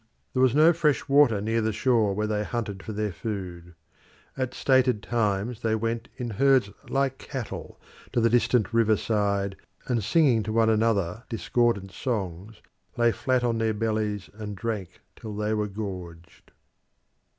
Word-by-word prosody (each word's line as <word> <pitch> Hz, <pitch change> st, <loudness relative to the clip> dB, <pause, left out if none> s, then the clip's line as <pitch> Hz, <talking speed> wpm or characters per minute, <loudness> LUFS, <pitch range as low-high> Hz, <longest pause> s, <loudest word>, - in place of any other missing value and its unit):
There 130 Hz, -, +1 dB
was 130 Hz, 0 st, +4 dB
no 160 Hz, +3 st, +6 dB
fresh 150 Hz, -3 st, +1 dB
water 140 Hz, -6 st, +5 dB
near 115 Hz, +2 st, 0 dB
the 110 Hz, 0 st, 0 dB
shore 110 Hz, -3 st, +2 dB
where 105 Hz, +1 st, 0 dB
they 105 Hz, -1 st, -1 dB
hunted 105 Hz, -4 st, -4 dB
for -, -, -7 dB
their 105 Hz, -1 st, -2 dB
food. 90 Hz, -3 st, -6 dB, 0.6 s
At 130 Hz, -1 st, -3 dB
stated 130 Hz, -5 st, +2 dB
times 115 Hz, 0 st, -1 dB
they 110 Hz, -1 st, +1 dB
went 115 Hz, +1 st, -2 dB
in 120 Hz, -2 st, -4 dB
herds 130 Hz, -1 st, +3 dB, 0.2 s
like 135 Hz, -1 st, 0 dB
cattle 130 Hz, -6 st, -7 dB, 0.3 s
to -, -, +1 dB
the 115 Hz, -, +4 dB
distant 120 Hz, -2 st, +2 dB
river 110 Hz, -2 st, +4 dB
side, 100 Hz, -2 st, 0 dB, 0.3 s
and 120 Hz, -4 st, 0 dB
singing 135 Hz, -, +3 dB
to 110 Hz, -, -4 dB
one 115 Hz, 0 st, +4 dB
another 110 Hz, -2 st, 0 dB
discordant 115 Hz, -4 st, 0 dB
songs, 100 Hz, -3 st, -4 dB, 0.3 s
lay 120 Hz, 0 st, +4 dB
flat 130 Hz, +1 st, 0 dB
on 115 Hz, -2 st, 0 dB
their 110 Hz, -1 st, 0 dB
bellies 105 Hz, -2 st, -1 dB
and 105 Hz, -1 st, -7 dB
drank 105 Hz, -5 st, -4 dB
till 110 Hz, -2 st, -8 dB
they 105 Hz, +1 st, -1 dB
were 105 Hz, -1 st, 0 dB
gorged. 90 Hz, -5 st, -8 dB
110 Hz, 160 wpm, -26 LUFS, 100-120 Hz, 0.6 s, no